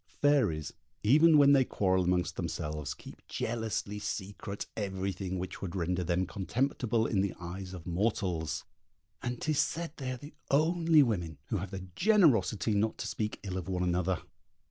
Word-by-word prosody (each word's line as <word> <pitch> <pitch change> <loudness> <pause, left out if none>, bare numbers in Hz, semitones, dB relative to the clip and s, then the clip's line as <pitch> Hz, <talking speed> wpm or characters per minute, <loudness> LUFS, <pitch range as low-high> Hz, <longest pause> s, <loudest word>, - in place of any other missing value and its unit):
Fairies, 130 - +3 0.3
even 155 +8 +6
when 140 -1 +7
they 135 -2 +6
quarrel 95 -6 +1
amongst 90 0 +1
themselves, 75 -1 -3
keep - - -13
jealously 110 -3 -2
secret 100 0 -4
everything 95 -2 -3
which 90 +1 -5
would 95 -2 -4
render 90 0 0
them 90 +2 +1
contemptible 115 +3 0
in 100 -4 +1
the 100 -1 -1
eyes 90 +2 -6
of 90 -3 -8
mortals, 85 - -1 0.6
and 125 -1 -3
'tis 155 -2 0
said 165 +2 0
they 130 -3 -4
are 130 - -3
the 145 +5 -11 0.2
only 160 +1 +4
women 85 - -2
who - - 0
have 95 +2 -4
the 95 -1 -6
generosity 140 - +4
not 105 +2 +1
to - - -4
speak 110 -1 -3
ill 95 -2 -3
of 90 - -7
one 90 -1 0
another. 90 0 0
100 Hz, 165 wpm, -31 LUFS, 90-125 Hz, 0.6 s, when